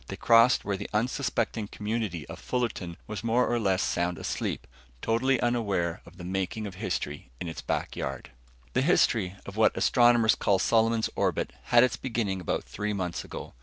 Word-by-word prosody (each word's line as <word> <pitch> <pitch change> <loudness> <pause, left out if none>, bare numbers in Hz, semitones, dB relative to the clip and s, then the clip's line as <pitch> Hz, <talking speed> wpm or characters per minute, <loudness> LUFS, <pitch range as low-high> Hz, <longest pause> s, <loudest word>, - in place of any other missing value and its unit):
They - - -5
crossed 115 +1 +5
where 100 -2 -1
the 100 - -6
unsuspecting 115 -1 -1
community 105 -7 -3
of - - -9
Fullerton 110 -9 -3
was 105 0 -6
more 115 +2 +2
or 120 0 +1
less 95 -3 +1
sound 85 0 0
asleep, - - -3 0.3
totally 120 - +1
unaware 100 -8 0
of 85 +1 -15
the 90 - -9
making 95 +4 -2
of 100 - -6
history 90 - -4
in - - -4
its 80 - -6
back - - -2
yard. 65 -1 -5 0.4
The 130 - +2
history 115 - +2
of 100 - -8
what 110 - +3
astronomers 120 -2 +5
call 100 - +2
Solomon's 115 +3 +2
Orbit - - 0
had 120 0 +6
its 125 - +1
beginning 110 -7 -2
about 90 - -1
three 105 0 -3
months 90 -4 -3
ago. - - -8
105 Hz, 175 wpm, -28 LUFS, 95-115 Hz, 0.4 s, had